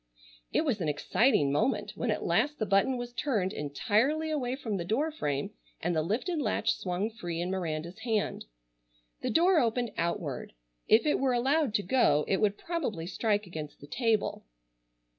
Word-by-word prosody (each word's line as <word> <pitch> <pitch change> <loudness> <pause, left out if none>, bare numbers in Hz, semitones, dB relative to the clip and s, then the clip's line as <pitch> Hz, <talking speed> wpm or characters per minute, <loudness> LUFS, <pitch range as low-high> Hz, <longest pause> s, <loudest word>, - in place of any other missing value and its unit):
It 320 - +1
was 230 -9 0
an 160 - 0
exciting 145 - +2
moment 150 - +1
when - - -2
at - - -1
last 295 0 +2
the 215 - -1
button 200 +7 +2
was 245 0 -6
turned 215 -10 0
entirely 230 - 0
away 260 -4 -1
from 225 -7 -3
the 175 - -2
door 265 - 0
frame 145 - -2 0.3
and 175 +1 -1
the 155 - +2
lifted 250 - -1
latch 215 - +1
swung 185 +4 -2
free 175 -6 -5
in 175 +2 -2
Miranda's 170 0 -3
hand. 220 -2 -1 0.8
The - - -1
door 345 +1 +4
opened 240 -1 0
outward. 165 - -2 0.3
If 220 +1 +5
it 300 - +2
were 265 -2 +2
allowed 265 0 +2
to 205 - +2
go 175 - +3
it 195 - +2
would 205 -1 +2
probably 275 - -3
strike 205 +3 0
against 155 -4 -7
the - - -11
table. 225 - 0
215 Hz, 175 wpm, -30 LUFS, 175-260 Hz, 0.8 s, If